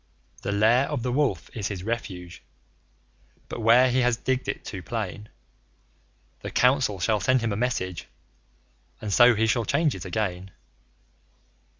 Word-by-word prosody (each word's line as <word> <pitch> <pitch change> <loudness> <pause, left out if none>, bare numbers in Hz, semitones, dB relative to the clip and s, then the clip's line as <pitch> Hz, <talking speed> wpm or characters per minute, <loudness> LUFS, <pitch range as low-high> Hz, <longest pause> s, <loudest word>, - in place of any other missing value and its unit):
The - - -3
Lair 110 +6 +3
of 145 -6 -3
the 125 - -1
Wolf 140 0 -1
is 105 -4 -2
his 95 -3 -5
refuge, 95 -6 -5 1.1
but - - -6
where 120 +3 +5
he 130 - +2
has 125 -2 +2
digged 130 +2 -2
it - - -4
too 95 - -6
plain, 105 +2 -5 1.1
The - - -6
Council 125 -6 +2
shall 105 +4 +1
send 130 +5 +2
him 115 -2 -1
a - - -2
message, 95 -7 -2 0.9
and 105 -2 -4
so 120 +1 +6
he 110 +2 +2
shall 115 +1 +1
change 145 +4 +1
it 95 - -7
again. 95 -1 -3
115 Hz, 155 wpm, -25 LUFS, 100-125 Hz, 1.1 s, so